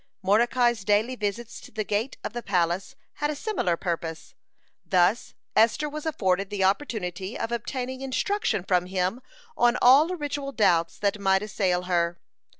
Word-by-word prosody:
(77) - - -12
Mordecai's 240 +1 +3
daily 210 +5 +2
visits 220 +1 -4
to - - -12
the 215 0 -3
gate 210 +6 -2
of - - -4
the 240 - -4
palace 185 +3 -1 0.3
had 295 - +1
a 300 - -2
similar 285 - -1
purpose. 165 -3 -4 0.5
Thus 185 +5 +1 0.2
Esther 230 +7 +3
was 305 +1 -6
afforded 195 -9 0
the 205 -2 -1
opportunity 195 -3 -1
of 230 - -3
obtaining 255 +2 -4
instruction 270 - -1
from 180 -1 +1
him 190 +5 -1 0.3
on 240 -3 +3
all 270 +6 +7
ritual 290 -3 -4
doubts 175 -7 +2
that 205 0 0
might 190 0 +2
assail 185 -4 0
her. 170 -1 0
210 Hz, 155 wpm, -26 LUFS, 185-250 Hz, 0.5 s, all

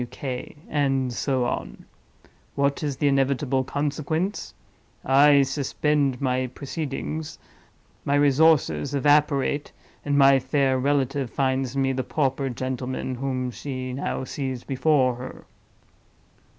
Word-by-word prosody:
T. - - -1
W. - - -6
K.'—and 135 0 -3
so 130 0 0
on. - - -4 0.7
What 140 0 0
is 145 -4 -2
the 145 - +1
inevitable 135 -1 +1
consequence? 150 +7 -2 0.5
I 140 +1 +6
suspend 140 -1 0
my 130 -2 0
proceedings; 150 +3 -5 0.7
my 140 - +1
resources 145 0 +3
evaporate; 145 0 +2 0.3
and 145 -1 0
my 135 -1 +6
fair 130 0 +1
relative 135 -1 0
finds 130 -1 -1
me 135 -1 +1
the 130 0 -2
pauper 135 0 -1
gentleman 130 +1 -4
whom 130 -1 -3
she 130 0 -5
now 130 0 -3
sees 130 -2 -4
before 135 -2 +2
her." 125 +1 -9
135 Hz, 115 wpm, -24 LUFS, 130-145 Hz, 0.7 s, I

